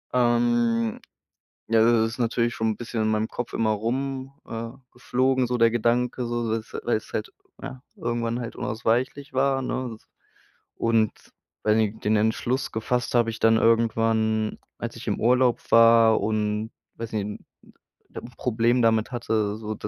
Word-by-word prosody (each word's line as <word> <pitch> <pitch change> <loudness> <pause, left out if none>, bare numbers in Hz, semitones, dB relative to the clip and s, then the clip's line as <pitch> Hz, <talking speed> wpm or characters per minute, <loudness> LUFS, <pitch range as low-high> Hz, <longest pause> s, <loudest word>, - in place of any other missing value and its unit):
Ähm, 120 -2 +2 0.7
ja, 115 -1 +4
das 115 -1 +4
ist - - -13
natürlich 120 0 0
schon 110 0 -1
'n 105 - -3
bisschen 120 -1 -4
in 110 - +1
meinem 110 +1 0
Kopf 120 - -5
immer 110 -1 +1
rum, 130 +5 -2
äh, 115 0 -6 0.2
geflogen 130 +1 0
so 125 0 -1
der 115 -1 +4
Gedanke 120 +2 0
so 120 -1 -2
s 110 -1 -6
weil - - +1
es - - -8
halt - - -4 0.3
ja, 130 -1 -7
irgendwann 120 0 -2
halt 115 - -6
unausweichlich 120 +6 -1
war, 135 0 +1
ne? 125 -2 -3
S 110 - -19 0.7
und 115 -2 +2 0.5
weiß 105 0 +3
nicht 110 -1 -1
den 110 +1 +3
Entschluss 115 +4 0
gefasst 120 +2 -2
habe 115 -1 +3
ich 110 - -8
dann 115 0 +4
irgendwann, 115 -1 +1 0.2
als - - -5
ich - - -10
im - - -1
Urlaub 125 +1 +3
war 115 -1 +6
und 105 0 -1 0.3
weiß 115 -1 -6
nicht 105 -2 -1
'n 105 - -8 0.7
'n - - -6
'n - - -13
Problem 120 +1 +1
damit 110 0 +2
hatte, 110 -3 -1
so 110 -1 -5
d 105 - -6
115 Hz, 170 wpm, -25 LUFS, 110-120 Hz, 0.7 s, war